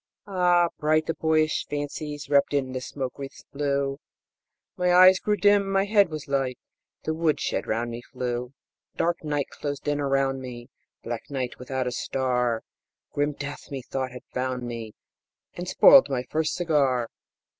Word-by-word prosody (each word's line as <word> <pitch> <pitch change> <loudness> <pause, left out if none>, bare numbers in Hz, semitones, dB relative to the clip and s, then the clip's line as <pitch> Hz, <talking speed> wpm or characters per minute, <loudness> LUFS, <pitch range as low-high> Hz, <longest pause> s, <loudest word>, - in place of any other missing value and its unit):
Ah, 180 -3 +3
bright 155 +1 +2
the 165 - -1
boyish 155 -1 +1
fancies 145 0 -4
Wrapped 145 0 +3
in 130 -2 0
the 130 0 -4
smoke 130 0 -5
wreaths 135 -1 -8
blue; 140 -1 -1 0.8
My 180 0 +1
eyes 185 +1 +8
grew 210 - +1
dim, 205 -1 +4
my 195 0 +2
head 205 -3 +4
was 155 -2 -6
light, 135 -3 0 0.5
The 155 - -1
woodshed 160 -1 0
round 120 +2 -1
me 115 +1 -6
flew! 125 -1 -3 0.4
Dark 170 0 0
night 145 -2 -1
closed 145 0 -5
in 145 0 +1
around 135 -1 +1
me 125 0 -9 0.3
Black 115 -1 -5
night, 130 -3 -4
without 130 0 -3
a 125 - -1
star 125 -2 -1 0.5
Grim 145 +1 0
death 145 0 -7
methought 135 -1 -4
had 125 0 -10
found 125 -1 -2
me 115 -3 -6 0.6
And 175 +1 -6
spoiled 270 - +7
my 130 -2 -1
first 155 0 0
cigar. 140 -8 +1
140 Hz, 155 wpm, -26 LUFS, 125-160 Hz, 0.8 s, eyes